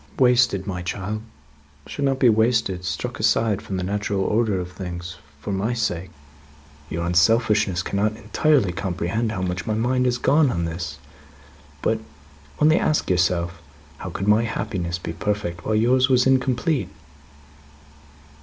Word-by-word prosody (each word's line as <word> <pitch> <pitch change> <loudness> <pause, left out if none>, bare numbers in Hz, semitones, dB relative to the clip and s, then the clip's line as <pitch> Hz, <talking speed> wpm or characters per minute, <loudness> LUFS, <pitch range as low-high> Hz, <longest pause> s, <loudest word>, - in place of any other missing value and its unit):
" - - -25
wasted, 120 -6 +3
my 90 -3 -4
child 100 +4 -4 0.6
should 145 - -5
not 135 -1 +1
be 130 - +4
wasted, 110 -4 +2
struck 90 - -4
aside 110 -3 +2
from 100 -4 -5
the 90 - -2
natural 100 +1 -1
order 105 -1 +1
of 90 0 -5
things 90 -1 -7 0.2
for 100 - -5
my 100 +5 -1
sake. 90 -6 -2 0.8
Your 85 +1 -3
unselfishness 95 +1 +3
cannot 105 +3 -1
entirely 140 - +2
comprehend 95 +4 -2
how 95 -3 -3
much 90 +3 -3
my 110 - 0
mind 125 +3 +1
has 125 -1 +1
gone 145 +2 +3
on 85 -7 -1
this; 85 +1 -5 0.9
but, 110 0 +1 0.6
only 155 +3 +5
ask 150 -10 +1
yourself, 85 -1 0 0.4
how 95 - -5
could 95 +3 -4
my 105 +2 +5
happiness 90 -6 -3
be 85 -1 -6
perfect, 90 -3 -3
while 110 - +1
yours 125 +4 +3
was 125 -1 +4
incomplete?" 130 +2 +1
105 Hz, 150 wpm, -23 LUFS, 90-120 Hz, 0.9 s, only